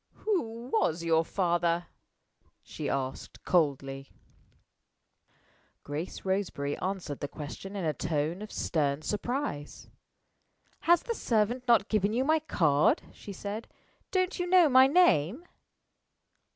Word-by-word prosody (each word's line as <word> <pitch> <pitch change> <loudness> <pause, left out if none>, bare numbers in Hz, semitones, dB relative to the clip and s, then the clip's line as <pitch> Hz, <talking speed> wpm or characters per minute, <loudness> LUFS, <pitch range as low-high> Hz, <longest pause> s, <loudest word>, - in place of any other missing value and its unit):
"Who 245 - -2
was 170 -6 +1
your 165 -1 +3
father?" 175 -1 0 0.8
she - - -5
asked, 135 -1 -4
coldly. 135 -5 0 1.7
Grace 150 +7 -6
Roseberry 190 -7 -1
answered 185 -7 -4
the 145 - -3
question 155 +8 -8
in 190 -4 -3
a 155 - +1
tone 160 +4 -2
of 215 - -8
stern 145 -2 -1
surprise. 210 - -3 1.0
"Has 345 0 +6
the 470 - -2
servant 240 - 0
not 230 -3 +4
given 210 -1 +1
you 250 +3 +1
my 315 +2 +3
card?" 155 - +2
she 205 - -10
said. 205 +3 -6 0.4
"Don't 370 0 0
you 355 - -1
know 360 -2 +6
my 260 0 +7
name?" 270 - +3
190 Hz, 120 wpm, -29 LUFS, 155-245 Hz, 1.7 s, my